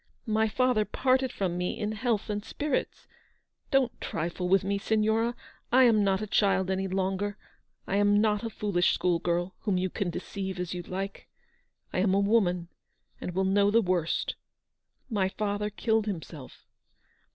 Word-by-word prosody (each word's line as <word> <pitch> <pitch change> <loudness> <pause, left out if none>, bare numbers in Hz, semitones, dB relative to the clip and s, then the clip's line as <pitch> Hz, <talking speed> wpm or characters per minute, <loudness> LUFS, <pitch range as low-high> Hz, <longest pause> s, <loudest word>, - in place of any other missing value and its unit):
My 220 -1 +2
father 250 0 +2
parted 260 +3 +1
from 180 -3 -2
me 180 +4 -2
in 210 -1 -1
health 220 -1 -1
and 205 -1 -3
spirits. 290 +4 -3 0.6
Don't 270 -4 +1
trifle 175 +2 -3
with 195 +1 +4
me, 200 +1 -1
Signora; 220 +3 +1 0.4
I 260 +2 +6
am 225 -4 +5
not 195 +1 +1
a - - -1
child 195 -2 +2
any 190 0 -1
longer, 195 +2 -1 0.5
I 195 - 0
am 205 0 +4
not 210 0 +2
a 230 - -2
foolish 205 -4 +1
school 175 -2 +1
girl, 175 +2 -1
whom 200 -3 0
you 185 0 -1
can 200 -4 -2
deceive 190 +2 -5
as 180 -1 -3
you 180 - -4
like. 190 +3 -5 0.7
I - - 0
am 190 0 +3
a - - +4
woman, 190 -5 +2 0.5
and 180 - -5
will 190 0 +2
know 200 +1 +3
the 225 +3 +4
worst. 180 -3 0 0.7
My 200 -6 0
father 205 +1 -2
killed 220 +1 0
himself!" 160 -7 -7
200 Hz, 165 wpm, -28 LUFS, 185-215 Hz, 0.7 s, I